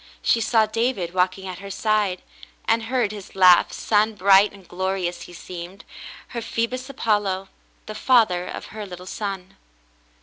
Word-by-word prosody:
She 230 - +3
saw 220 -1 +3
David 215 -5 -1
walking 185 +1 0
at 185 -1 -6
her 200 0 -9
side, 205 -2 0 0.4
and 225 0 +2
heard 240 -3 0
his 205 -3 -10
laugh, 180 -2 +6
sun 215 0 +1
bright 200 +1 +5
and 195 -3 -16
glorious 180 -1 -2
he 175 - -10
seemed, 175 +2 -9 0.4
her 235 - -5
Phoebus 250 +4 -3
Apollo 205 -7 -1 0.2
— - - -37
the 215 - -7
father 210 -8 +3
of - - -6
her 215 -1 -6
little 180 -1 -9
son. 195 -2 -6
200 Hz, 160 wpm, -23 LUFS, 185-220 Hz, 0.4 s, laugh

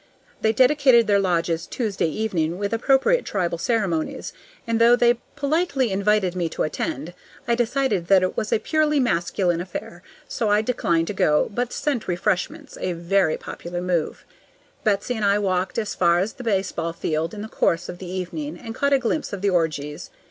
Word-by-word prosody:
They 220 - +3
dedicated 260 -1 +5
their 205 -1 +3
lodges 170 -3 0
Tuesday 210 -8 -1
evening 170 -3 -1
with 205 +2 -2
appropriate 270 - +3
tribal 175 -4 -2
ceremonies. 190 -6 -1 0.3
And 230 -1 0
though 235 +1 +7
they 240 -1 +3 0.2
politely 285 - 0
invited 195 -1 +1
me 175 -2 -1
to - - -2
attend, 155 +1 -3 0.3
I 235 - +2
decided 235 -6 0
that 190 -1 +5
it 185 - -1
was 215 - -2
a - - +4
purely 300 +5 +1
masculine 175 -6 0
affair, 175 -1 -7 0.3
so 220 - -1
I 210 +1 +3
declined 170 -9 +1
to 210 - -4
go, 150 0 +2
but 245 +2 -1
sent 275 -7 -2
refreshments, 190 - -2
a 180 - -1
very 170 0 +1
popular 175 +1 -6
move. 175 -3 -2 0.6
Betsy 210 +3 +1
and 220 -3 -3
I 200 0 +4
walked 185 -2 -1
as 215 -2 -1
far 170 -1 +3
as 190 +5 -1
the 250 - -10
baseball 190 -6 -1
field 165 +2 -2
in 205 - -6
the - - -6
course 170 -5 0
of 175 - -8
the 185 - -7
evening, 175 -4 -4
and 225 +2 -8
caught 280 +4 +1
a - - +6
glimpse 260 +2 -2
of 200 -1 -5
the 200 - +3
orgies. 150 -4 -1
200 Hz, 185 wpm, -23 LUFS, 175-235 Hz, 0.6 s, though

